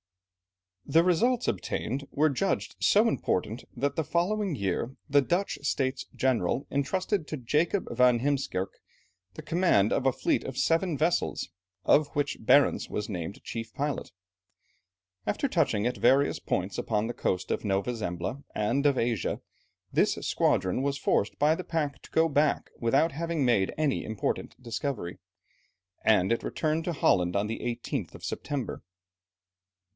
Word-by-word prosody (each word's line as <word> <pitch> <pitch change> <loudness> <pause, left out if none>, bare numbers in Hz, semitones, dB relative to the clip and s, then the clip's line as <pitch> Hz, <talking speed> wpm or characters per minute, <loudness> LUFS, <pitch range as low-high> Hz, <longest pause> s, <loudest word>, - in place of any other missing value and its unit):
The 165 +1 +4
results 230 +8 +2
obtained 135 +4 -2
were 155 +1 +3
judged 195 +9 -1
so 215 +3 +4
important, 110 - -1
that 140 +3 0
the 160 - 0
following 185 +3 0
year, 100 +4 -2
the 145 -1 +4
Dutch 175 +8 -1
States 135 -2 -1
General 130 -1 +1
entrusted 180 +5 0
to 155 - -4
Jacob 150 - 0
van 125 -1 +5
Heemskerke, 135 -8 -1 0.6
the - - -8
command 165 - +3
of 135 - +1
a - - +5
fleet - - 0
of 130 -1 -6
seven 165 -1 +2
vessels, 165 +4 0 0.4
of 150 0 +5
which 145 -1 -2
Barentz 140 +5 +4
was 105 - -3
named 90 0 -5
chief 115 -1 -5
pilot. 145 0 -2 1.2
After 280 - 0
touching 145 - +1
at 125 0 0
various 140 +2 +3
points 95 +1 -2
upon 105 -1 0
the 120 - -3
coasts 90 -5 -1
of - - -1
Nova 100 +3 0
Zembla 95 +5 -4
and 115 +7 +1
of 140 -2 +2
Asia, 115 -5 0 0.5
this - - +3
squadron 95 +7 +1
was 140 0 0
forced 105 - 0
by 150 +2 +4
the 180 - -4
pack 150 -6 -2
to - - -14
go 160 0 +4
back 150 -1 +1
without 135 +8 +3
having 165 -1 -1
made 105 -6 +3
any 155 -3 +1
important 110 +3 -3
discovery, 115 -5 -4 0.8
and 105 -2 +4
it 115 - +1
returned 155 +1 -1
to 175 - -1
Holland 90 - +2
on 100 +1 +2
the 110 +2 -4
18th 120 -1 -4
of - - -9
September. 145 -4 -4
135 Hz, 150 wpm, -28 LUFS, 110-155 Hz, 1.2 s, van